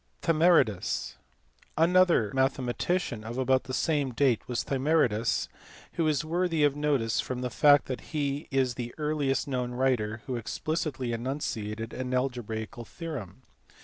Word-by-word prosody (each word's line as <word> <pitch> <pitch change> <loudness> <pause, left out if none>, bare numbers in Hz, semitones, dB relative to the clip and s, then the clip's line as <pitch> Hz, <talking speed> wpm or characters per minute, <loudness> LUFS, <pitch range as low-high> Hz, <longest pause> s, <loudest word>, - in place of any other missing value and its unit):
Thymaridas. 160 - +2 0.6
Another 170 - +4
mathematician 130 0 0
of 115 +2 -6
about 130 0 +2
the 130 - -6
same 145 -5 0
date 130 -3 +3
was 120 -1 -1
Thymaridas, 130 -5 +1 0.5
who 165 - 0
is 155 +1 +1
worthy 165 -1 +1
of 145 -1 +3
notice 140 -6 +1
from 125 -1 -4
the 125 -1 -3
fact 145 +2 +5
that 130 - -4
he 145 -2 -3
is 130 -2 +1
the 120 0 -6
earliest 150 -3 0
known 125 -2 -2
writer 120 -4 0
who 130 -2 -3
explicitly 130 +1 -3
enunciated 115 -3 -4
an 130 0 -3
algebraical 120 -2 -3
theorem. 130 - -7
130 Hz, 135 wpm, -28 LUFS, 120-150 Hz, 0.6 s, fact